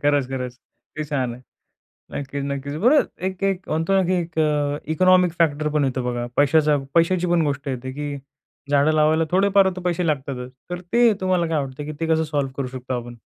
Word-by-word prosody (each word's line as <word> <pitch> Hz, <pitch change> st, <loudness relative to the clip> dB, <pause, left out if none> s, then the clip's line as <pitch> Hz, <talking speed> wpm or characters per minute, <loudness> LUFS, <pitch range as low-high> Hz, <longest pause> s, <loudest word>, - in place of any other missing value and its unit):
खरंच-खरंच 130 Hz, -3 st, 0 dB, 0.4 s
ते 155 Hz, -, -2 dB
छान 130 Hz, -5 st, -2 dB
आहे. 125 Hz, -, -14 dB, 0.7 s
नक्कीच, 140 Hz, 0 st, -4 dB
नक्कीच. 140 Hz, 0 st, -4 dB
बरं 285 Hz, +5 st, +6 dB, 0.3 s
एक 190 Hz, 0 st, -8 dB
एक 195 Hz, -1 st, -1 dB
म्हणतो 165 Hz, +4 st, 0 dB
ना, 190 Hz, -1 st, +4 dB
की -, -, +3 dB
एक 170 Hz, -2 st, -3 dB
अ, 145 Hz, -1 st, +1 dB
इकॉनॉमिक 185 Hz, +2 st, +4 dB
फॅक्टर 155 Hz, -2 st, +2 dB
पण 150 Hz, -1 st, +1 dB
येतो 130 Hz, -1 st, -2 dB
बघा. 120 Hz, 0 st, -2 dB
पैशाचा 150 Hz, +1 st, +4 dB, 0.2 s
पैशाची 175 Hz, +2 st, +3 dB
पण 175 Hz, -1 st, +3 dB
गोष्ट 140 Hz, 0 st, -3 dB
येते, 130 Hz, -1 st, -4 dB
की 145 Hz, +1 st, -4 dB, 0.5 s
झाडं 145 Hz, +2 st, +4 dB
लावायला 155 Hz, +1 st, +3 dB
थोडेफार 195 Hz, +1 st, +4 dB
तर 185 Hz, -, -6 dB
पैसे 180 Hz, -1 st, -1 dB
लागतातच. 135 Hz, -4 st, -3 dB, 0.2 s
तर 175 Hz, 0 st, -4 dB
ते 235 Hz, -2 st, +5 dB
तुम्हाला 185 Hz, -2 st, +1 dB
काय 160 Hz, -2 st, 0 dB
वाटतं, 135 Hz, +2 st, -7 dB
की 155 Hz, -, -5 dB
ते 165 Hz, -, -1 dB
कसं 160 Hz, 0 st, +1 dB
सॉल्व्ह 140 Hz, -2 st, -1 dB
करू 135 Hz, -2 st, -2 dB
शकतो 130 Hz, 0 st, -5 dB
आपण? 120 Hz, 0 st, -10 dB
150 Hz, 195 wpm, -22 LUFS, 140-175 Hz, 0.7 s, बरं